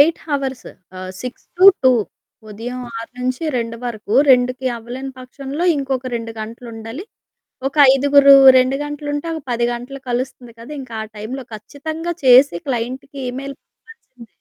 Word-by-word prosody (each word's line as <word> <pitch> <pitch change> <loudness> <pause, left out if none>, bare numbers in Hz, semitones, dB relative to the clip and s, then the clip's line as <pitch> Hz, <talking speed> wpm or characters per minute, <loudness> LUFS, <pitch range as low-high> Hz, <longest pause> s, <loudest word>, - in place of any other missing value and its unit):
8 320 +3 +4
hours, 270 -3 -3 0.3
ఆహ్, 185 0 -6
6 250 0 -7
to 370 - +4 0.2
2 260 - +6 0.6
ఉదయం 240 +4 -6 0.2
6 230 - -8
నుంచి 255 +5 -2
2 230 -1 -3
వరకు. 220 -3 -5 0.2
2కి 250 -1 +5 0.2
అవ్వలేని 250 +4 -7
పక్షంలో 275 +5 -5
ఇంకొక 265 -2 -3
2 230 0 -6
గంటలు 230 +3 -8
ఉండాలి. 225 - -8 0.6
ఒక 275 - -8 0.2
ఐదుగురు, 280 0 +6 0.2
2 255 +1 +3
గంటలు 295 0 -6
ఉంటే, 290 +3 -3
ఒక 320 - -5
10 235 0 +1
గంటలు 250 +3 -7
కలుస్తుంది 245 -1 -4
కదా! 235 +5 -11
ఇంకా 245 -3 -9
ఆ - - -7
టైంలో 250 +6 -6
ఖచ్చితంగా 315 +10 -6
చేసి 260 +2 +6
క్లయింట్‌కి 260 +3 -4
ఈమెయిల్ 275 +2 -6
పంపాల్సిందె. 260 - -18
255 Hz, 150 wpm, -19 LUFS, 235-280 Hz, 0.6 s, 2